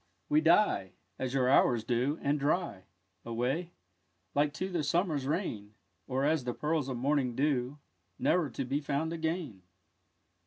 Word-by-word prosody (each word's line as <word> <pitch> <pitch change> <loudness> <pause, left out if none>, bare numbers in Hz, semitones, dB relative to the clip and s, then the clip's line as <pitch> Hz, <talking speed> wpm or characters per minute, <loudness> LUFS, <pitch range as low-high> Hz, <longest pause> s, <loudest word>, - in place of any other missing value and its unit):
We 150 +1 +4
die 160 - +3 0.3
As 130 0 -2
your 130 -2 +3
hours 120 -3 +4
do, 125 +6 0
and 145 +1 +1
dry 145 - -1 0.4
Away 125 +9 -1 0.6
Like 145 +1 +2
to 185 - -2
the 175 -3 0
summer's 150 -2 0
rain; 110 - -3 0.3
Or 135 +1 0
as 155 -2 +2
the 125 -1 -3
pearls 150 -3 -1
of 130 - -3
morning's 130 -1 +1
dew 135 -1 0 0.4
Ne'er 170 -4 +2
to 130 +2 -4
be 140 +4 -1
found 150 +3 -1
again. 160 - -3
140 Hz, 150 wpm, -31 LUFS, 125-160 Hz, 0.6 s, We